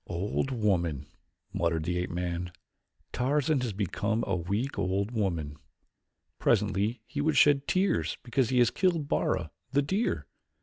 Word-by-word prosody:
"Old 95 Hz, +9 st, -1 dB
woman," 90 Hz, -, 0 dB, 0.5 s
muttered 85 Hz, -2 st, 0 dB
the 90 Hz, +2 st, -1 dB
ape 90 Hz, -, -2 dB
man. 90 Hz, 0 st, -3 dB, 0.6 s
"Tarzan 145 Hz, +2 st, +1 dB
has 125 Hz, -3 st, -1 dB
become 105 Hz, +3 st, -1 dB
a 95 Hz, -, 0 dB
weak 100 Hz, +8 st, -2 dB
old 100 Hz, +3 st, 0 dB
woman. 85 Hz, -10 st, -2 dB, 0.8 s
Presently 105 Hz, +3 st, +1 dB
he 145 Hz, +4 st, -3 dB
would 155 Hz, +1 st, +1 dB
shed 145 Hz, -1 st, +5 dB
tears 185 Hz, -, +1 dB
because 125 Hz, -1 st, +1 dB
he 130 Hz, -, +1 dB
has 120 Hz, -1 st, +5 dB
killed 170 Hz, -6 st, +1 dB
Bara, -, -, 0 dB, 0.2 s
the 140 Hz, +1 st, +3 dB
deer. 195 Hz, +11 st, -1 dB
105 Hz, 140 wpm, -29 LUFS, 90-135 Hz, 0.8 s, shed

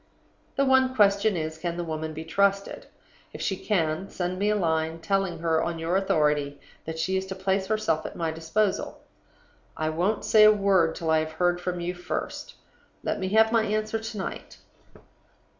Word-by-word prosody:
"The 275 Hz, -, +2 dB
one 260 Hz, -1 st, +3 dB
question 200 Hz, -2 st, +3 dB
is, 160 Hz, 0 st, -4 dB
Can 170 Hz, 0 st, -3 dB
the 175 Hz, -, -2 dB
woman 160 Hz, -1 st, -4 dB
be 160 Hz, +1 st, -7 dB
trusted? 200 Hz, -, 0 dB, 0.5 s
If -, -, -8 dB
she 195 Hz, -, 0 dB
can, 185 Hz, -2 st, -1 dB
send 180 Hz, 0 st, -3 dB
me 205 Hz, +1 st, +1 dB
a 210 Hz, -, +2 dB
line, 160 Hz, -3 st, 0 dB
telling 195 Hz, -1 st, 0 dB
her, 160 Hz, -1 st, +1 dB
on 170 Hz, -1 st, -2 dB
your 165 Hz, +2 st, -1 dB
authority, 150 Hz, -6 st, +1 dB, 0.3 s
that 160 Hz, 0 st, -5 dB
she 185 Hz, +4 st, 0 dB
is 190 Hz, 0 st, -3 dB
to 190 Hz, -, -5 dB
place 190 Hz, 0 st, -1 dB
herself 215 Hz, -7 st, 0 dB
at -, -, -10 dB
my 165 Hz, -2 st, -1 dB
disposal. 165 Hz, +6 st, -1 dB, 0.8 s
I 155 Hz, 0 st, -1 dB
won't 180 Hz, +7 st, -1 dB
say 215 Hz, -1 st, +6 dB
a 215 Hz, -, +9 dB
word 195 Hz, -6 st, +2 dB
till 160 Hz, -1 st, -2 dB
I 160 Hz, -, +4 dB
have 155 Hz, 0 st, -4 dB
heard 175 Hz, +2 st, +1 dB
from 180 Hz, 0 st, -3 dB
you 175 Hz, +1 st, -3 dB
first. 180 Hz, -, -5 dB, 0.5 s
"Let -, -, -2 dB
me 190 Hz, -1 st, -2 dB
have 220 Hz, +2 st, +4 dB
my 230 Hz, -1 st, +4 dB
answer 215 Hz, +1 st, -1 dB
to 220 Hz, 0 st, -7 dB
night. 190 Hz, -, -6 dB
185 Hz, 190 wpm, -26 LUFS, 160-205 Hz, 0.8 s, a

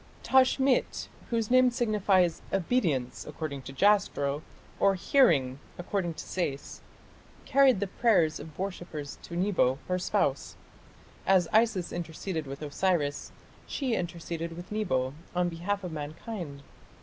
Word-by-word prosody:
Tashmit, 265 Hz, 0 st, +3 dB, 0.2 s
whose 230 Hz, -1 st, -1 dB
name 255 Hz, 0 st, +6 dB
signifies 200 Hz, -8 st, +2 dB
"Obedience", 170 Hz, -, 0 dB
according 150 Hz, -2 st, -5 dB
to 135 Hz, -, -9 dB
Jastrow, 145 Hz, -4 st, +2 dB, 0.4 s
or 195 Hz, -1 st, +4 dB
"Hearing", 155 Hz, -, +3 dB, 0.2 s
according 175 Hz, -2 st, -2 dB
to -, -, -6 dB
Sayce, 145 Hz, -7 st, -4 dB, 0.6 s
carried 270 Hz, -5 st, +5 dB
the 200 Hz, -, 0 dB
prayers 190 Hz, -6 st, +2 dB
of 155 Hz, 0 st, -10 dB
worshippers 175 Hz, -6 st, -5 dB
to 170 Hz, -, -8 dB
Nebo, 175 Hz, -8 st, +2 dB
her 180 Hz, 0 st, 0 dB
spouse. -, -, 0 dB, 0.7 s
As 185 Hz, -3 st, +4 dB
Isis 220 Hz, -5 st, +2 dB
interceded 165 Hz, -1 st, -4 dB
with 140 Hz, +3 st, -7 dB
Osiris, 150 Hz, -1 st, 0 dB, 0.4 s
she 265 Hz, -4 st, -2 dB
interceded 170 Hz, -2 st, -4 dB
with 175 Hz, +3 st, -9 dB
Nebo, 130 Hz, -12 st, 0 dB, 0.2 s
on 180 Hz, 0 st, +2 dB
behalf 190 Hz, +4 st, -3 dB
of 180 Hz, -, -4 dB
mankind. 155 Hz, 0 st, -6 dB
175 Hz, 125 wpm, -29 LUFS, 155-205 Hz, 0.7 s, name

